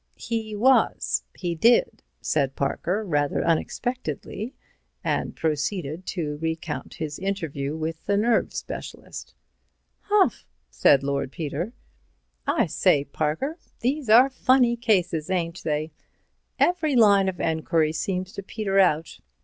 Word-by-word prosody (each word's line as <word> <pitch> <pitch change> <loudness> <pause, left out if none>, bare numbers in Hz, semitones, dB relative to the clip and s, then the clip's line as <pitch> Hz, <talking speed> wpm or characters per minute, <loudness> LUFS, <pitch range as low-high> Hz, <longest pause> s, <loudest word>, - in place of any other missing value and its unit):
"He 220 -2 -3
was; 205 - +3 0.2
he 175 -1 -2
did," 240 - +3 0.2
said 140 -3 0
Parker, 175 +9 -1
rather 145 -5 0
unexpectedly, 240 - -2 0.5
and - - -1
proceeded 160 +2 -2
to 150 -5 -3
recount 160 -1 -4
his 150 -2 -5
interview 160 -7 -3
with 160 0 -5
the 200 0 +2
nerve 225 +2 +2
specialist. - - -7 0.6
"Humph!" 410 -2 +1 0.2
said 140 -1 +4
Lord 140 -1 -1
Peter. 165 - -4 0.7
"I - - +3
say, 140 - +2
Parker, 160 - -2 0.2
these 265 0 -1
are 250 +5 +7
funny 255 -2 +3
cases, 185 -9 +1
ain't 170 -2 -2
they? 155 0 -1 0.7
Every 330 -5 +2
line 200 -4 +5
of 180 - -7
enquiry 160 -1 +1
seems 185 +3 -3
to - - -5
peter 195 0 -1
out. 165 -4 +2
180 Hz, 120 wpm, -25 LUFS, 155-225 Hz, 0.7 s, are